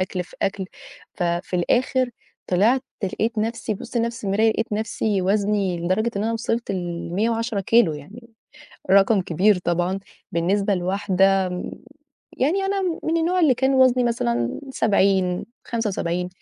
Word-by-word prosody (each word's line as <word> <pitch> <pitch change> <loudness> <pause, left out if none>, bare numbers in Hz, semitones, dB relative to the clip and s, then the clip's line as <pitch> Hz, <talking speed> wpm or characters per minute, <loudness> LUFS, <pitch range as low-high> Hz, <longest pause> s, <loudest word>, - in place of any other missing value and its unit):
أكل 185 0 -2
في - - -17
أكل، 195 -1 -1 0.5
ففي 175 0 -1
الآخر 250 +7 +1 0.4
طلعت 220 +8 +3 0.2
لقيت 220 +4 -2
نَفْسي 225 0 -2
بابُص 235 - -7
لنَفْسي 230 0 -1
في 205 - -6
المراية 215 +3 +3
لقيت 225 0 -2
نَفْسي 210 -2 -1
وزني 200 -2 +1
لدرجة 190 +7 0
إن 205 - -1
أنا 230 - 0
وصلت 230 0 -2
ل110 200 +5 -2
كيلو، 200 -4 +4
يعني 205 - -11 0.6
رقم 195 +1 +5
كبير 185 +3 +2
طبعًا 175 +2 -1 0.3
بالنسبة 195 +4 +1
لواحدة 190 +1 +2
م 180 0 -5 0.7
يعني 335 +10 +1
أنا 390 0 0
م 350 -3 -2
من 325 +1 0
النوع 350 +3 +1
اللي 295 -6 +5
كان 265 +2 +1
وزني 255 -1 +4
مثلًا 120 - -1
70 195 -5 +2 0.2
75 180 -6 -2
205 Hz, 145 wpm, -23 LUFS, 185-235 Hz, 0.7 s, رقم